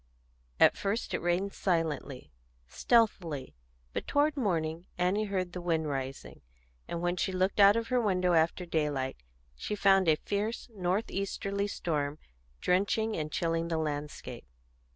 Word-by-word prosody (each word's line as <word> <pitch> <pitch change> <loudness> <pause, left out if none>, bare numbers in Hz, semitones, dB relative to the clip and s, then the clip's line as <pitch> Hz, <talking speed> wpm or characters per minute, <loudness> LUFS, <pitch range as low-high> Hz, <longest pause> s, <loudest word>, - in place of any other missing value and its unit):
At - - +6
first 205 +4 -2
it - - -1
rained 175 +3 0
silently, 160 -7 -2 0.4
stealthily; 175 - +1 0.4
but - - -4
toward 295 +1 +2
morning 170 - -1
Annie 185 +4 +1
heard 185 -3 -2
the 180 - -5
wind 165 -3 0
rising, 135 -1 -5 0.5
and 170 0 -4
when 175 +1 0
she 190 - 0
looked 185 +2 0
out 200 +1 +8
of 230 0 -2
her 250 -1 +2
window 185 -4 +2
after 165 +2 +2
daylight 145 -5 -1 0.4
she 210 - -4
found 195 -2 +4
a 155 - +6
fierce 205 +8 -3
north 185 +3 -1
easterly 200 +1 -2
storm 150 -6 -2 0.4
drenching 205 +4 +1
and 155 -1 -3
chilling 165 -2 0
the 165 -1 -1
landscape. 150 - -4
180 Hz, 145 wpm, -30 LUFS, 160-200 Hz, 0.5 s, out